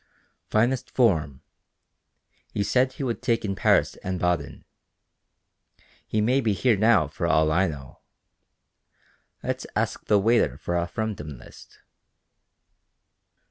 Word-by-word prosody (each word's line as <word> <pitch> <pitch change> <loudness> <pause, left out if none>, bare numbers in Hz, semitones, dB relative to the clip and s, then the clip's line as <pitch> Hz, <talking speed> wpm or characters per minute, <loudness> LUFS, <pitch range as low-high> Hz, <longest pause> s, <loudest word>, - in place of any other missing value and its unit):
"Finest 120 +4 +1
form. 80 - +1 1.2
Said 130 +6 +2
he 140 - -6
would 120 -3 -2
take 115 -3 0
in 100 - -1
Paris - - +2
and 95 0 -4
Baden. 85 -5 -2 1.4
He 110 - 0
may 125 +5 +2
be 110 -4 +1
here 120 +3 +2
now 110 -6 +3
for 85 +4 -3
all 80 -2 +3
I 90 +4 +3
know. 70 -4 -9 1.4
Let's - - -3
ask - - -2
the 105 - +4
waiter 115 +4 +2
for 85 - -3
a 85 0 0
Fremden 85 - -5
List." - - -16
100 Hz, 120 wpm, -25 LUFS, 80-115 Hz, 1.4 s, the